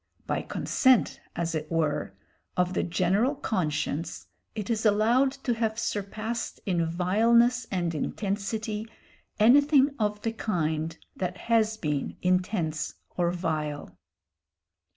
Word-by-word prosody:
By -, -, -1 dB
consent, 260 Hz, -4 st, +2 dB
as 170 Hz, -1 st, -1 dB
it 155 Hz, 0 st, -4 dB
were, 150 Hz, -9 st, 0 dB, 0.4 s
of 180 Hz, 0 st, +2 dB
the -, -, +1 dB
general 190 Hz, -, +1 dB
conscience 155 Hz, -, -2 dB, 0.3 s
it 210 Hz, -3 st, -4 dB
is 220 Hz, -1 st, 0 dB
allowed 230 Hz, +5 st, +4 dB
to 245 Hz, -, +1 dB
have 225 Hz, -1 st, -1 dB
surpassed 220 Hz, +1 st, -3 dB
in 175 Hz, -5 st, +1 dB
vileness 230 Hz, +8 st, +3 dB
and 175 Hz, -3 st, -1 dB
intensity 210 Hz, +5 st, -3 dB, 0.5 s
anything 280 Hz, +5 st, +6 dB
of 210 Hz, -1 st, 0 dB
the 225 Hz, -, -1 dB
kind 160 Hz, -6 st, -1 dB, 0.2 s
that 180 Hz, 0 st, -3 dB
has 220 Hz, -1 st, +1 dB
been 150 Hz, -7 st, -2 dB
intense 180 Hz, -3 st, 0 dB, 0.2 s
or 175 Hz, -1 st, +2 dB
vile. 155 Hz, -4 st, -3 dB
195 Hz, 115 wpm, -27 LUFS, 165-225 Hz, 0.5 s, anything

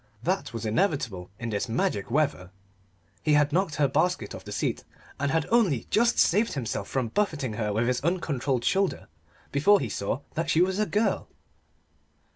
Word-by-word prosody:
That 185 Hz, +3 st, -1 dB
was 115 Hz, -2 st, -5 dB
inevitable 110 Hz, -, -1 dB
in 115 Hz, 0 st, -4 dB
this 105 Hz, +2 st, -2 dB
magic 105 Hz, -3 st, -1 dB
weather. 135 Hz, -9 st, 0 dB, 0.7 s
He 150 Hz, -, +2 dB
had 145 Hz, 0 st, +3 dB
knocked 180 Hz, -4 st, +1 dB
her 140 Hz, 0 st, +3 dB
basket 135 Hz, -, 0 dB
off -, -, -8 dB
the -, -, -9 dB
seat, -, -, -2 dB, 0.4 s
and 140 Hz, +1 st, 0 dB
had 160 Hz, +2 st, +1 dB
only 200 Hz, -, +3 dB
just 235 Hz, +2 st, +3 dB
saved 210 Hz, +6 st, +3 dB
himself 125 Hz, -6 st, -3 dB
from 130 Hz, -4 st, -1 dB
buffeting 155 Hz, -, -1 dB
her 105 Hz, -1 st, -2 dB
with 110 Hz, +3 st, +1 dB
his 125 Hz, +1 st, 0 dB
uncontrolled 140 Hz, -7 st, -1 dB
shoulder 195 Hz, -1 st, 0 dB, 0.4 s
before 200 Hz, +9 st, +5 dB
he 125 Hz, -, -3 dB
saw 100 Hz, +7 st, -2 dB
that 165 Hz, +1 st, -2 dB
she 165 Hz, -, +3 dB
was 190 Hz, +2 st, -1 dB
a 215 Hz, -, +1 dB
girl. 210 Hz, +2 st, 0 dB
145 Hz, 175 wpm, -27 LUFS, 115-185 Hz, 0.7 s, before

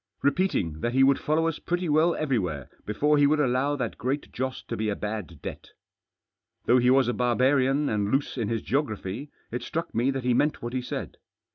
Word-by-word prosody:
Repeat 185 Hz, +7 st, +2 dB
ing 80 Hz, -2 st, -1 dB
that 120 Hz, +6 st, -1 dB
he 135 Hz, +1 st, +5 dB
would 135 Hz, 0 st, +4 dB
follow 160 Hz, +2 st, +1 dB
us 165 Hz, -, -2 dB
pretty 175 Hz, +1 st, -2 dB
well 160 Hz, +3 st, +3 dB
everywhere 95 Hz, -, -2 dB, 0.2 s
before 150 Hz, +8 st, +2 dB
he 145 Hz, -, +6 dB
would 150 Hz, +1 st, +2 dB
allow 135 Hz, +1 st, +1 dB
that 135 Hz, -, -4 dB
Great 135 Hz, +3 st, -2 dB
Joss 130 Hz, 0 st, -3 dB
to 115 Hz, -, -5 dB
be 110 Hz, -1 st, -1 dB
a 100 Hz, -, -1 dB
bad 105 Hz, -7 st, -5 dB
debt. -, -, -7 dB, 1.0 s
Though 125 Hz, +1 st, +5 dB
he 125 Hz, 0 st, +3 dB
was 130 Hz, -1 st, +5 dB
a 120 Hz, -, +1 dB
barbarian 130 Hz, +4 st, +2 dB
and 105 Hz, -3 st, 0 dB
loose 140 Hz, +1 st, 0 dB
in 115 Hz, -5 st, -1 dB
his 115 Hz, -1 st, -2 dB
geo 140 Hz, +3 st, +2 dB
graphy, 110 Hz, +1 st, -6 dB, 0.2 s
it 120 Hz, +1 st, -3 dB
struck 165 Hz, +7 st, -4 dB
me 120 Hz, +4 st, +1 dB
that 135 Hz, -1 st, -2 dB
he 125 Hz, 0 st, +2 dB
meant 145 Hz, +3 st, +1 dB
what 120 Hz, +1 st, -4 dB
he 130 Hz, -, -1 dB
said. 125 Hz, -, -5 dB
130 Hz, 220 wpm, -26 LUFS, 115-145 Hz, 1.0 s, he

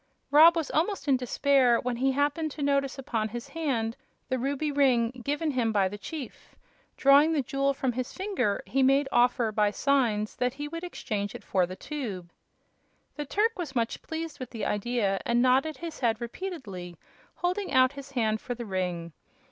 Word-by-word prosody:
Rob 320 Hz, +4 st, +8 dB
was 325 Hz, -4 st, -2 dB
almost 345 Hz, +3 st, 0 dB
in 275 Hz, -, +5 dB
despair, 255 Hz, -1 st, +3 dB
when 245 Hz, -1 st, -2 dB
he 265 Hz, +2 st, +2 dB
happened 290 Hz, +3 st, 0 dB
to 295 Hz, -, -5 dB
notice 275 Hz, -1 st, +1 dB
upon 230 Hz, -5 st, -2 dB
his 240 Hz, +5 st, -7 dB
hand 260 Hz, -8 st, -1 dB, 0.3 s
the 260 Hz, -1 st, 0 dB
ruby 280 Hz, +4 st, -1 dB
ring 255 Hz, -5 st, +3 dB
given 295 Hz, +3 st, -1 dB
him 240 Hz, -4 st, 0 dB
by 200 Hz, -3 st, +2 dB
the 205 Hz, +2 st, -6 dB
chief. 290 Hz, 0 st, -8 dB, 0.4 s
Drawing 285 Hz, +4 st, +6 dB
the 290 Hz, -4 st, +1 dB
jewel 275 Hz, +2 st, 0 dB
from 265 Hz, -2 st, 0 dB
his 250 Hz, +1 st, -4 dB
finger 380 Hz, -, -1 dB
he 270 Hz, -, 0 dB
made 270 Hz, +2 st, +4 dB
offer, 240 Hz, -2 st, +3 dB
by 210 Hz, -1 st, +2 dB
signs, 225 Hz, -4 st, +1 dB
that 250 Hz, +1 st, 0 dB
he 290 Hz, +1 st, -5 dB
would 335 Hz, +3 st, -6 dB
exchange 205 Hz, -, -4 dB
it -, -, -9 dB
for 185 Hz, -2 st, +1 dB
the 185 Hz, -, -7 dB
tube. 200 Hz, -, -6 dB, 0.8 s
The 295 Hz, -, -4 dB
Turk 425 Hz, +6 st, +1 dB
was 305 Hz, -6 st, -5 dB
much 230 Hz, -2 st, -1 dB
pleased 320 Hz, -1 st, -6 dB
with 255 Hz, -2 st, -6 dB
the 225 Hz, -3 st, -4 dB
idea, 210 Hz, -2 st, 0 dB
and 235 Hz, 0 st, +1 dB
nodded 260 Hz, +5 st, +3 dB
his 335 Hz, -2 st, -7 dB
head 230 Hz, -3 st, +1 dB
repeatedly, 230 Hz, -, -6 dB, 0.4 s
holding 365 Hz, +3 st, -2 dB
out 255 Hz, 0 st, +5 dB
his 280 Hz, -1 st, -9 dB
hand 220 Hz, -4 st, 0 dB
for 245 Hz, -, -4 dB
the 235 Hz, 0 st, -6 dB
ring. 180 Hz, -4 st, -3 dB
260 Hz, 185 wpm, -28 LUFS, 225-290 Hz, 0.8 s, Rob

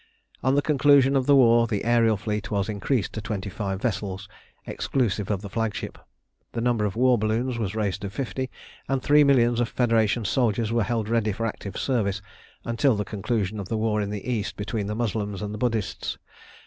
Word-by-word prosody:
On 130 Hz, +1 st, +2 dB
the 145 Hz, -, +2 dB
conclusion 140 Hz, -2 st, +4 dB
of 130 Hz, -2 st, +1 dB
the 145 Hz, -, +6 dB
war 120 Hz, -3 st, +5 dB
the 105 Hz, -4 st, -1 dB
aërial 115 Hz, -2 st, +3 dB
fleet 105 Hz, 0 st, -3 dB
was 100 Hz, 0 st, -1 dB
increased 105 Hz, +2 st, -1 dB
to 110 Hz, -, -4 dB
twenty 100 Hz, -2 st, -4 dB
five 95 Hz, -1 st, -3 dB
vessels 100 Hz, -3 st, -3 dB, 0.4 s
exclusive 105 Hz, -6 st, -1 dB
of 100 Hz, -1 st, -1 dB
the -, -, -5 dB
flagship. 115 Hz, 0 st, -3 dB, 0.5 s
The 115 Hz, -, -2 dB
number 115 Hz, -2 st, +1 dB
of 105 Hz, -, -2 dB
war 125 Hz, 0 st, +4 dB
balloons 115 Hz, +3 st, -1 dB
was 105 Hz, -2 st, -2 dB
raised 105 Hz, -4 st, -1 dB
to 100 Hz, -, -4 dB
fifty, 130 Hz, +3 st, -4 dB, 0.4 s
and 135 Hz, -1 st, +1 dB
three 150 Hz, +1 st, +6 dB
millions 120 Hz, -4 st, +4 dB
of 120 Hz, -1 st, +1 dB
Federation 115 Hz, -3 st, +1 dB
soldiers 115 Hz, 0 st, +1 dB
were 115 Hz, 0 st, +2 dB
held 110 Hz, 0 st, -1 dB
ready 115 Hz, -1 st, +1 dB
for 115 Hz, +3 st, -3 dB
active 100 Hz, -3 st, -5 dB
service 105 Hz, -7 st, 0 dB, 0.5 s
until 120 Hz, +2 st, +2 dB
the 105 Hz, 0 st, -2 dB
conclusion 105 Hz, 0 st, -2 dB
of 95 Hz, -, -6 dB
the 115 Hz, -, -1 dB
war 110 Hz, -1 st, +1 dB
in 100 Hz, -, -2 dB
the 105 Hz, +1 st, -5 dB
East 115 Hz, -5 st, -2 dB
between 105 Hz, 0 st, -3 dB
the 105 Hz, -, -3 dB
Moslems 105 Hz, -3 st, -2 dB
and 105 Hz, 0 st, -5 dB
Buddhists. 115 Hz, -4 st, -2 dB
110 Hz, 195 wpm, -25 LUFS, 105-120 Hz, 0.5 s, the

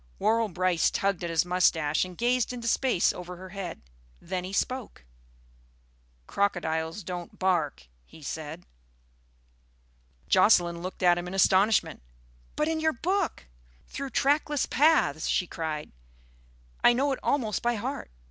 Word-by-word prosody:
Worrall 225 Hz, 0 st, +2 dB
Brice 180 Hz, -1 st, +1 dB
tugged 195 Hz, -3 st, -1 dB
at 170 Hz, -, -2 dB
his 165 Hz, +1 st, +2 dB
moustache 165 Hz, -4 st, +2 dB
and 180 Hz, -1 st, -8 dB
gazed 245 Hz, 0 st, +1 dB
into 240 Hz, -2 st, -5 dB
space 245 Hz, -5 st, +2 dB
over 180 Hz, 0 st, -8 dB
her 185 Hz, +1 st, -10 dB
head. 185 Hz, -, -7 dB, 0.4 s
Then 185 Hz, 0 st, -4 dB
he 185 Hz, -, -6 dB
spoke. 235 Hz, -, -3 dB, 1.2 s
"Crocodiles 165 Hz, -, -1 dB
don't 175 Hz, 0 st, -7 dB
bark," 175 Hz, -, 0 dB, 0.2 s
he 150 Hz, -, -16 dB
said. 160 Hz, +4 st, -6 dB, 1.6 s
Jocelyn 175 Hz, -3 st, +4 dB
looked 185 Hz, +1 st, -6 dB
at 175 Hz, -1 st, +5 dB
him 175 Hz, -, -6 dB
in 185 Hz, -, -5 dB
astonishment. 195 Hz, -, +3 dB, 0.5 s
"But 300 Hz, -, 0 dB
in 320 Hz, 0 st, -1 dB
your 315 Hz, 0 st, +1 dB
book, 370 Hz, +8 st, -1 dB, 0.4 s
Through 275 Hz, 0 st, -5 dB
Trackless 290 Hz, +2 st, +1 dB
Paths!" 290 Hz, -, +3 dB
she 180 Hz, -, +1 dB
cried, 160 Hz, -3 st, -5 dB, 0.9 s
"I -, -, +7 dB
know 275 Hz, +4 st, +1 dB
it 265 Hz, -, -2 dB
almost 225 Hz, -8 st, 0 dB
by 240 Hz, 0 st, +1 dB
heart. 205 Hz, -, -4 dB
185 Hz, 140 wpm, -27 LUFS, 170-240 Hz, 1.6 s, I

